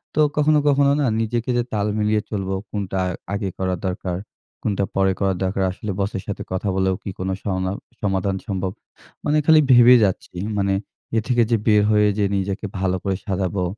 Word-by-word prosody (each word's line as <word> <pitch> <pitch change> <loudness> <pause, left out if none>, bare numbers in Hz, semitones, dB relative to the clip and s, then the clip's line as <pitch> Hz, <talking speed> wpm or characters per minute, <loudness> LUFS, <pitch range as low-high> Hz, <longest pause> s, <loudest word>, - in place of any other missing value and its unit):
তো - - 0 0.2
কখনো, 150 0 +4
কখনো 140 0 +4
না - - +2 0.2
নিজেকে 120 +2 -2
যে 120 - +2
তাল 105 0 0
মিলিয়ে 105 0 +2
চলবো 95 -2 -2 0.2
কোনটা 95 -2 -3
আ - - -1 0.2
আগে 100 -2 -1
করা 95 -1 -1
দরকার, 90 -1 -3 0.5
কোনটা 100 -2 0
পরে 95 0 +3
করা 95 -1 +2
দরকার। 95 +1 0
আসলে 100 +2 -5
বসের 95 -1 -2
সাথে 100 - -4
কথা 95 +2 -1
বলেও 95 -1 +1
কি - - -5
কোন 95 - -2
সংলা 95 -2 -1 0.3
সমাধান 95 -1 0
সম্ভব। 95 -2 -2 0.5
মানে 150 +1 +2
খালি 160 -1 +7
ভেবে 125 0 +8
যাচ্ছি। 90 -1 -3 0.2
মানে 100 0 +1 0.4
এ - - +5
থেকে 120 -2 +3
যে 115 - +4
বের 105 -1 +5
হয়ে 105 -1 +4
যে 100 - +3
নিজেকে 100 +2 -2
ভালো 95 -1 +1
করে 95 -1 0
সাজাবো। 95 -2 -1
100 Hz, 185 wpm, -22 LUFS, 95-110 Hz, 0.5 s, ভেবে